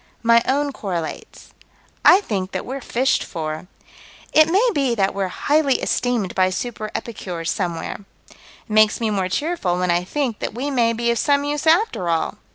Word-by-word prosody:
My 235 0 +5
own 285 +2 +1
correlates: 180 -10 -6 0.5
I 375 +3 +7
think 195 - -3
that - - -3
we're 270 +2 -5
fished 260 +2 +1
for. 155 +1 -5 0.7
It 310 +1 +6
may 400 +8 +3
be 270 -6 +1
that 195 -2 +1
we're 195 -1 -1
highly 285 +7 +1
esteemed 235 -7 -1
by 185 0 +2
super 215 +2 -4
epicures 180 -7 -4
somewhere. 175 -4 -3 0.3
It - - -19 0.3
makes 215 0 +4
me 225 -2 0
more 190 -3 -1
cheerful 245 - -1
when 180 -1 +1
I 175 +1 +1
think 250 +2 -2
that - - -4
we 275 +4 -3
may 235 -3 +2
be 235 +1 0
of 235 - -1
some 285 -1 +2
use 295 +2 -2
after 315 - +2
all. 165 -1 -1
230 Hz, 175 wpm, -21 LUFS, 185-280 Hz, 0.7 s, I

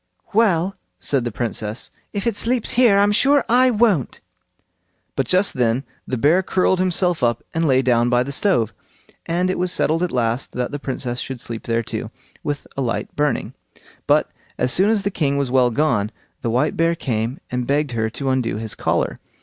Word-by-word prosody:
"Well!" 195 -4 +2 0.2
said 135 -4 0
the 120 - -2
Princess, 110 0 -3 0.2
"if 200 -2 -3
it 230 -3 +1
sleeps 235 +2 +1
here, 240 -5 +5
I'm 205 +1 +4
sure 275 +5 +4
I 255 +2 +5
won't." 210 - +1 1.0
But 135 -3 -1
just 185 +2 +3
then 125 +1 +1 0.2
the 130 - -2
bear 155 +10 +4
curled 185 0 +1
himself 180 -2 +1
up 120 -1 +1
and 165 0 +1
lay 130 -1 +3
down 120 -1 +3
by 125 0 +3
the 140 - -5
stove; 135 - +1 0.5
and 180 +2 +1
it - - -3
was 180 0 +1
settled 165 0 +1
at 180 - 0
last 120 0 -1
that 125 -1 -2
the 145 - -4
Princess 125 -3 -3
should 130 -2 -5
sleep 115 -1 -7
there 115 0 0
too, - - -5 0.3
with 145 -1 -4
a 140 - -2
light 120 -3 -3
burning. 145 -1 -1 0.5
But - - +3 0.3
as 125 0 +2
soon 195 +3 +4
as 215 -3 +2
the 200 - -1
king 140 -6 0
was 140 -3 -1
well 125 -1 +4
gone, 115 -5 +1 0.3
the 115 - -1
white 120 +3 +1
bear 165 +1 +2
came 120 -3 -2
and 125 -1 -2
begged 145 0 +1
her 110 -2 -1
to 135 +4 -3
undo 130 -4 0
his 110 0 -4
collar. - - -1
140 Hz, 195 wpm, -21 LUFS, 120-185 Hz, 1.0 s, here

